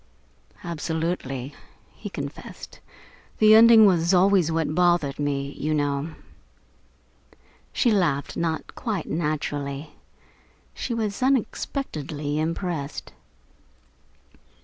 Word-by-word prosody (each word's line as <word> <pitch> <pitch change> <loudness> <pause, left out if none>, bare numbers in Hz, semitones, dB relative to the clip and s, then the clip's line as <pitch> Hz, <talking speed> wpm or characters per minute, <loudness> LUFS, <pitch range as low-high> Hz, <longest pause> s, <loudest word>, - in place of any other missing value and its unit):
"Absolutely," 160 -5 -3 0.4
he - - -8
confessed. - - -8 0.6
"The 215 0 +6
ending 225 0 +8
was 175 -2 +3
always 185 -3 +4
what 160 -1 0
bothered 175 -5 +2
me, 140 -1 -1
you 155 +2 -2
know." 145 +1 -1 1.6
She 240 - +2
laughed, 170 -9 0
not 165 -1 -2
quite 210 -9 -3
naturally. 150 -2 -3 0.8
She 240 - -4
was 215 -2 -3
unexpectedly 155 - -1
impressed. 165 -2 -3
160 Hz, 85 wpm, -24 LUFS, 145-195 Hz, 1.6 s, ending